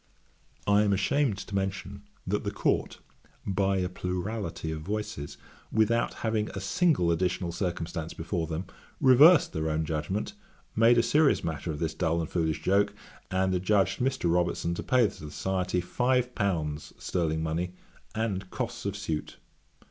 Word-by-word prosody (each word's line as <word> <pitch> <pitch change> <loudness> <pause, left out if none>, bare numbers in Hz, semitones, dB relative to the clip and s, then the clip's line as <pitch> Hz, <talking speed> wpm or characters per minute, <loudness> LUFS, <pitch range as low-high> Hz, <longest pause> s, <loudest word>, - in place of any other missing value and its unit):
I 100 0 +4
am 105 -1 +3
ashamed 110 +3 +1
to 100 - -8
mention, 95 0 -3 0.2
that - - -1
the - - -1
Court, - - 0 0.5
by 95 0 +1
a 90 -1 0
plurality 90 -1 -3
of 80 -1 -4
voices, 100 -6 -4 0.3
without 115 +2 +2
having 110 -1 0
a - - -2
single 115 - +2
additional 90 +1 0
circumstance 85 -2 -3
before 80 0 -2
them, 85 +3 -3 0.3
reversed 140 +6 +7
their 80 0 -1
own 80 +1 0
judgement, 80 - -2 0.4
made 115 +2 +5
a 115 - +5
serious 150 +4 +3
matter 80 0 -3
of 75 - -2
this 80 0 -2
dull 80 +1 0
and 80 - -3
foolish 80 -3 -1
joke, 100 +2 +2 0.3
and 95 0 +1
adjudged 95 +1 +2
Mr. 125 -10 +1
Robertson 85 -1 0
to - - -4
pay 130 -1 +3
to - - -4 0.2
the - - -7
Society 90 +2 -1
five 125 +6 +1
pounds 80 -9 -2
(sterling 80 -3 -1
money) 85 +3 -2 0.4
and 100 -4 -2
costs 120 -1 -4
of 100 0 -3
suit. 80 -7 -4
95 Hz, 155 wpm, -28 LUFS, 85-110 Hz, 0.5 s, reversed